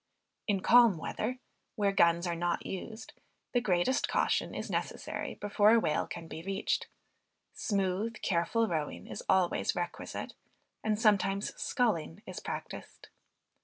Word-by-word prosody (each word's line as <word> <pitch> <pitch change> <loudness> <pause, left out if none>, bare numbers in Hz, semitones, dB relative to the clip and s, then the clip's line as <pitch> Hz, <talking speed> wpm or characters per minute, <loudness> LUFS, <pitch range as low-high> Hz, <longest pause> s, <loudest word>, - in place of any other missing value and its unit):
In 200 -3 +1
calm 235 -3 +6
weather, 225 +9 -3 0.4
where 205 -3 +2
guns 170 -2 +4
are 175 - 0
not 175 0 -1
used, 220 +4 -6 0.4
the 245 - +3
greatest 190 +4 +2
caution - - +1
is - - -4
necessary - - -3
before 205 +1 +4
a - - +6
whale 155 -8 0
can 165 -1 -7
be 160 - -7
reached; 195 +3 -1 0.7
smooth 200 +2 -1
careful 195 +6 +1
rowing 155 -6 -3
is - - -6
always 185 -2 +2
requisite, 175 0 -4 0.5
and 215 -1 +1
sometimes 200 -2 +2
sculling 190 - -1
is - - -6
practiced. - - -7
195 Hz, 130 wpm, -31 LUFS, 175-220 Hz, 0.7 s, calm